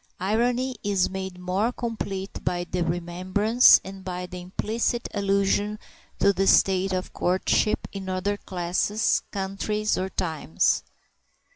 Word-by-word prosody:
Irony 245 +6 0
is 200 -3 +1
made 190 -1 -5
more 185 +6 0
complete 210 -5 -5
by 175 -1 -1
the 175 0 -3
remembrance, 185 +7 +4
and 190 0 -9
by 180 -1 -4
an 180 0 -8
implicit 215 +6 -2
allusion 200 +1 +1 0.4
to 200 - +4
the 195 0 0
state 190 0 +4
of 185 0 -3
courtship 185 +3 +1
in 195 -1 -6
other 185 +2 -1
classes, 185 +4 0
countries, 205 +2 -1
or 190 +1 -2
times. 155 - 0
190 Hz, 125 wpm, -25 LUFS, 180-210 Hz, 0.4 s, remembrance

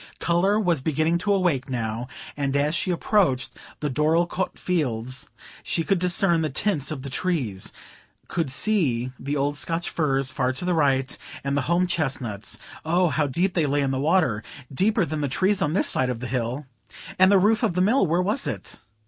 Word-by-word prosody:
Colour 185 +5 +2
was 175 -9 +1
beginning 160 +4 +1
to 205 +3 0
awake 175 -10 +1
now, 115 -1 -3 0.3
and 140 -1 -1
as 145 +2 +2
she 185 - -1
approached 175 - +1 0.3
the 150 - 0
Dorlcote 165 +6 +1
fields, 130 -7 -2 0.3
she 165 - -1
could 195 +2 +1
discern 175 -1 +3
the 155 - 0
tints 150 0 -1
of 140 -4 -5
the 140 - -5
trees, 130 - -2 0.6
could 165 -5 -1
see 130 - +1
the 140 +3 -2
old 145 +1 0
Scotch 165 +3 -2
firs 135 -4 0
far 130 -1 0
to 130 - -5
the 180 - +1
right, 135 -4 +1 0.3
and 140 0 -1
the 145 - +2
home 175 +1 +3
chestnuts,—oh, 155 - -2
how 150 -1 +1
deep 175 +8 0
they 160 -4 +1
lay 145 +1 +1
in 135 - 0
the 130 - -1
water,—deeper 145 - 0
than 155 0 -3
the 145 - 0
trees 190 +8 +1
on 150 -2 +1
this 190 - +2
side 130 -1 +3
the 125 - -5
hill! 125 +3 -2 0.5
And 190 +1 +7
the 200 - +6
roof 215 +5 +3
of 215 -8 +1
the 180 - +2
Mill—where 185 - +3
was 205 +3 0
it? - - -5
155 Hz, 180 wpm, -24 LUFS, 135-180 Hz, 0.6 s, And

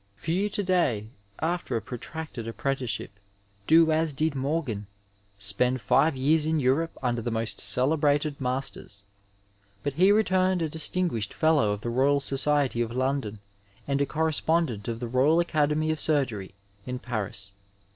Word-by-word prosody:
Few 175 - -1
to 205 - -2
day, 140 - 0 0.3
after 165 -6 -2
a - - -3
protracted 130 -1 -7
apprenticeship, 125 -2 -3 0.6
do 160 0 +5
as 155 -2 0
did 155 +1 0
Morgan, 135 -7 -2 0.5
spend 110 +6 +1
five 150 +4 +2
years 150 +4 +2
in 160 0 +1
Europe 145 +5 0
under 120 -2 0
the 120 - -3
most 115 -1 0
celebrated 145 +6 +2
masters, 125 -5 -4 0.8
but 145 - -2
he 185 +7 +4
returned 185 -4 +2
a 160 - -1
distinguished 160 - -1
Fellow 155 -10 +3
of 105 0 -4
the 120 - -3
Boyal 135 +4 +2
Society 140 -2 +1
of 115 -1 -2
London, 130 -5 -2 0.5
and 140 0 0
a 140 - +1
Correspondent 160 -7 0
of 115 -1 -3
the 120 - -3
Royal 135 +7 +3
Academy 155 -2 +1
of 155 - -3
Surgery 120 -11 +1 0.3
in 125 0 -3
Paris. 105 -5 -4
140 Hz, 145 wpm, -26 LUFS, 120-160 Hz, 0.8 s, do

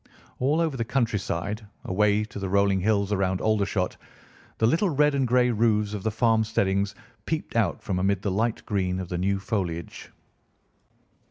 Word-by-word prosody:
All 145 +5 +2
over 160 -4 0
the 120 - -1
countryside, 110 -4 -1 0.2
away 105 +2 +2
to 105 - -8
the 95 -1 -3
rolling 100 0 +3
hills 100 +1 +1
around 95 -2 +1
Aldershot, 100 -3 0 0.6
the 110 - +2
little 165 - +2
red 150 -1 +3
and 135 -2 +1
grey 125 0 +3
roofs 105 -2 +1
of 105 - -4
the 110 - 0
farm 115 0 +2
steadings 100 -2 0 0.3
peeped - - -3
out - - +1
from 90 - -1
amid 95 0 0
the 100 - 0
light 110 +4 -1
green 95 -3 -1
of 90 -2 -5
the 90 - -2
new 95 +2 +1
foliage. 95 -5 -4
105 Hz, 170 wpm, -26 LUFS, 95-115 Hz, 0.6 s, rolling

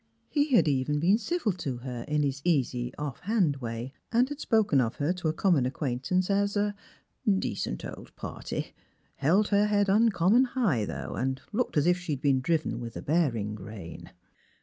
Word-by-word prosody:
He 290 -3 +2
had 225 - +5
even 145 +1 +1
been 190 +8 +4
civil 310 -2 0
to 155 -8 -4
her 120 -1 -6
in 150 0 +1
his 140 -1 -1
easy 125 -7 +1
off 145 -4 -5
hand 185 -8 +1
way, 120 +1 -5 0.2
and 240 +2 +4
had 290 0 -6
spoken 210 - +3
of 115 -2 -1
her 150 +5 0
to 180 -3 -3
a - - +3
common 160 -7 +2
acquaint 130 -2 -3
ance 185 0 +2
as 200 +1 +1
a 205 0 +1 0.5
*' 200 -2 +4
decent 100 - -3
old - - -9
party; - - -5
" - - -40
" - - -40
held 200 +6 +4
her 205 0 +3
head 205 -1 +2
uncommon 215 +2 +4
high, 210 - 0
though, - - -5
and 130 +1 -1
looked 230 -5 -1
as 145 - +3
if 180 +1 +3
she'd 155 -6 -3
been 135 -2 +3
driven 160 +2 0
with 115 -2 -6
a - - -7
bearing 125 -10 +1
rein." 100 -4 -9
160 Hz, 195 wpm, -28 LUFS, 130-205 Hz, 0.5 s, had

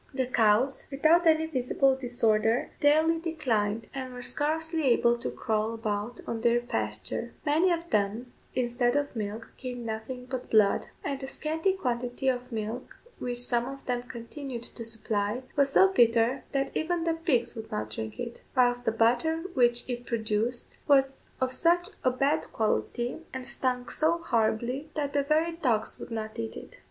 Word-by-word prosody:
The 260 -1 +1
cows, 240 +2 +2
without 315 +5 +4
any 320 0 +5
visible 270 -2 +2
disorder, 235 -2 +1
daily 315 +3 +4
declined, 230 -10 -1
and 260 -1 -5
were 250 0 -7
scarcely 320 +3 0
able 240 -1 +4
to 235 - -4
crawl 220 0 -1
about 220 +1 -3
on 225 -1 -3
their 235 0 +4
pasture: 110 - -3
many 320 +5 +3
of 340 0 -1
them, 215 +4 0 0.2
instead 245 0 +1
of 285 -2 0
milk, 215 +1 -4
gave 250 -2 -5
nothing 235 +2 -5
but 255 -1 -5
blood; 210 -3 +4 0.2
and 275 -1 -2
the 265 - -6
scanty 320 +7 0
quantity 250 -5 -1
of 250 0 -2
milk 220 +1 -5 0.2
which 245 -1 -3
some 240 0 0
of 275 0 -8
them 245 -1 -1
continued 245 +1 -7
to 235 - -6
supply 225 +1 -2
was 280 -1 +3
so 385 - +7
bitter 235 0 +3
that 275 0 -1
even 335 +1 0
the 330 -1 +1
pigs 265 -8 0
would 220 -1 -7
not 110 0 -3
drink 110 0 -6
it; 235 -1 -5 0.2
whilst 245 -1 +3
the - - +3
butter 245 +9 +2
which 240 -3 +3
it 245 -1 -4
produced 225 +1 -1
was 270 -2 +3
of 260 0 +1
such 350 +4 +3
a 255 - +5
bad 275 +5 0
quality, 240 +4 -1 0.2
and 260 -1 -4
stunk 250 -2 -1
so 320 +2 +2
horribly, 245 0 0
that 285 -2 -2
the 285 - +3
very 310 +4 +2
dogs 255 -10 0
would - - -8
not 220 -1 -5
eat 115 -1 -4
it. - - -10
245 Hz, 170 wpm, -28 LUFS, 230-285 Hz, 0.2 s, so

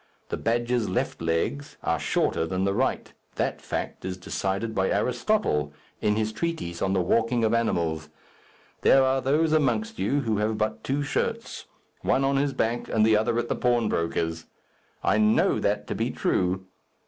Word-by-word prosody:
The - - -2
badger's 120 0 0
left - - -2
legs 85 +13 -1
are - - 0
shorter 80 - 0
than 95 +3 -1
the 100 0 +1
right, 130 +6 -1 0.2
That - - -1
fact - - -4
is 95 0 -4
decided 95 +4 -2
by 95 -2 +1
Aristotle, 120 - 0 0.3
in 105 0 +2
his 110 0 0
treatise 110 - -3
on 95 - +1
the 95 - +2
walking 115 +6 +1
of 110 0 +2
animals. 80 -9 0 0.7
There 135 - +6
are 130 0 +2
those 155 +4 +2
amongst 215 +9 +1
you 145 +1 +1
who 110 -4 0
have 105 +1 0
but 110 0 -2
two 140 +2 -1
shirts 140 - -3 0.3
one 135 - +2
on 135 0 +2
his 140 0 +1
back, 115 0 -1
and 110 -1 +3
the 110 -1 +5
other 110 +2 +1
at 120 0 0
the - - -1
pawnbroker's. 85 -9 0 0.6
I 110 - +3
know 105 0 +3
that - - 0
to - - -3
be - - -1
true. 95 +1 0
110 Hz, 170 wpm, -26 LUFS, 95-130 Hz, 0.7 s, There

